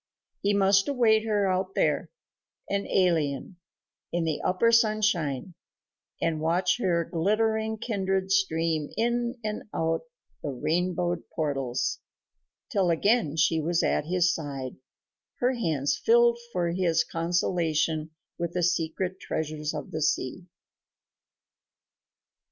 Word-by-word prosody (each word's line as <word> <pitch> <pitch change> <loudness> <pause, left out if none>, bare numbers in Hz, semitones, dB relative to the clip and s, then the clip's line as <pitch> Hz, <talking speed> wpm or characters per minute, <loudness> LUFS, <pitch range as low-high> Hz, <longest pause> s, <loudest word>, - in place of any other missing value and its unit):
He 200 +1 +2
must 195 0 +4
await 225 -5 +3
her 205 -2 +2
out 185 0 -1
there, - - +1 0.6
an 200 0 -1
alien, 165 -3 +1 0.5
in 170 0 0
the 160 -2 -1
upper 210 +6 +2
sunshine, 210 - +2 0.7
and 160 -2 -1
watch 180 +6 +1
her 170 -6 +1
glittering 220 +6 0
kindred 195 -4 -1
stream 165 -5 +1
in 240 +1 0
and 215 0 -4
out 165 - 0 0.4
the 150 - -3
rainbowed 175 +5 -1
portals 135 -5 -1 0.7
till 190 -3 +2
again 170 -1 +2
she 160 +1 +3
was 170 +2 +1
at - - +1
his 175 +1 +2
side, 135 -5 -5 0.6
her 250 +1 +2
hands 160 - 0
filled 235 0 +4
for 175 -3 0
his 170 -2 +2
consolation 165 -2 0 0.3
with 170 0 -2
the 180 - 0
secret 180 +2 -1
treasures 155 -1 -3
of 150 -3 -6
the 155 - -3
sea. 150 +4 -1
175 Hz, 115 wpm, -27 LUFS, 160-200 Hz, 0.7 s, must